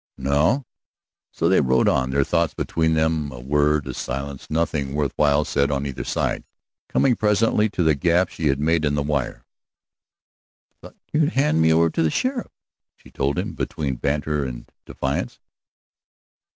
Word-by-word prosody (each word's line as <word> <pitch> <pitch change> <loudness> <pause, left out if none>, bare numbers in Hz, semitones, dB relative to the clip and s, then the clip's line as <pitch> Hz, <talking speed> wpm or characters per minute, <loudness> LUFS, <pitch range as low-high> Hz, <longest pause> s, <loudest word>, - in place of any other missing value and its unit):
"No." 75 - +1 0.7
So 85 - 0
they 95 - +4
rode 65 -2 +2
on, 65 0 +2
their 70 +1 +2
thoughts 85 +2 0
between 80 -1 0
them, 80 -2 0
a 65 - -9
word, 75 +3 +1
a - - -5
silence, 70 +1 -5
nothing 75 -3 -1
worth 75 -2 0
while 75 0 +3
said 70 +1 +1
on 70 -1 -1
either 70 -2 -4
side, - - -1 0.5
coming 130 -3 +3
presently 105 0 +2
to 90 - -1
the 80 -1 +4
gap 85 +5 +2
she 80 - -2
had 70 -1 +1
made 80 +2 +1
in 75 -1 +1
the 75 - 0
wire. 70 -4 -2 1.3
"I - - -57
thought - - -13 0.2
you'd 155 +1 +2
hand 135 - +2
me 80 0 +4
over 80 0 +3
to - - -1
the 80 - +3
sheriff," 255 - -2 0.5
she - - -19
told 70 +1 -1
him, - - -2
between 70 -5 -3
banter 75 +2 -1
and - - -6 0.2
defiance. 65 +1 -3
75 Hz, 170 wpm, -22 LUFS, 70-85 Hz, 1.3 s, they